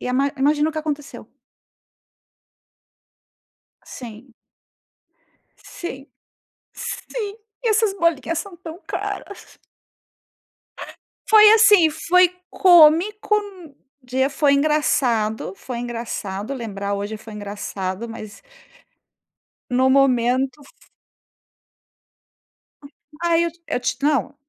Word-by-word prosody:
E - - -6
ima 270 +3 +1
imagina 295 +3 +2
o - - -4
que 310 - -4
aconteceu? 295 -2 -6 2.6
Sim. 240 0 -11 1.3
Sim. 285 -8 -8 0.7
Sim, 425 -4 -6 0.3
e 470 - 0
essas 435 -2 +2
bolinhas 335 -4 0
são 390 -3 -7
tão 335 0 -10
caras. 405 - -7 1.2
Ah. - - -9 0.3
Foi 425 -1 +8
assim, 415 -6 +6
foi 350 +3 +3 0.2
cômico, 365 +5 +5 0.7
de 260 +2 0
foi 280 0 +2
engraçado. 255 -9 +1
Foi 245 +3 -7
engraçado 230 -2 -5
lembrar, 200 -5 -4
hoje 205 +2 -4
foi 220 0 -12
engraçado, 205 0 -5
mas 215 -2 -10 1.3
no 255 +1 +2
momento, 260 +1 +2
f - - -22 2.0
Hum, 285 - -10 0.4
ai, 335 0 +2
eu 340 - -1 0.2
eu - - -1
te 245 - -2
não. 285 -1 +1
275 Hz, 95 wpm, -21 LUFS, 235-335 Hz, 2.6 s, Foi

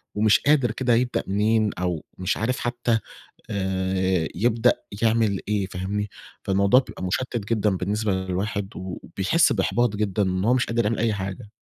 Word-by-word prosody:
ومش 105 0 +4
قادر 140 -6 +3
كده 120 0 +1
يبدأ 120 +1 +1
منين 105 +2 +2
أو 90 -3 -2
مش 95 0 -1
عارف 125 +4 -1
حتى، 120 -1 0 0.5
آآ، 95 -3 0
يبدأ 115 +4 +3 0.3
يعمل 110 -3 +2
إيه، 105 -2 0
فاهمني، 100 +3 -3 0.3
فالموضوع 100 +6 +4
بيبقى 110 - -8
مُشتت 115 +3 -2
جدًا 110 -2 +2
بالنسبة 105 +3 -1
للواحد 95 +2 -2
وبيحس 95 - 0
بإحباط 120 -3 +1
جدًا 105 -1 0
إن 95 0 -1
هو 125 - +4
مش 125 -1 +2
قادر 115 0 0
يعمل 110 +2 0
أي 115 -1 +1
حاجة. 95 +2 -5
105 Hz, 155 wpm, -24 LUFS, 95-115 Hz, 0.5 s, ومش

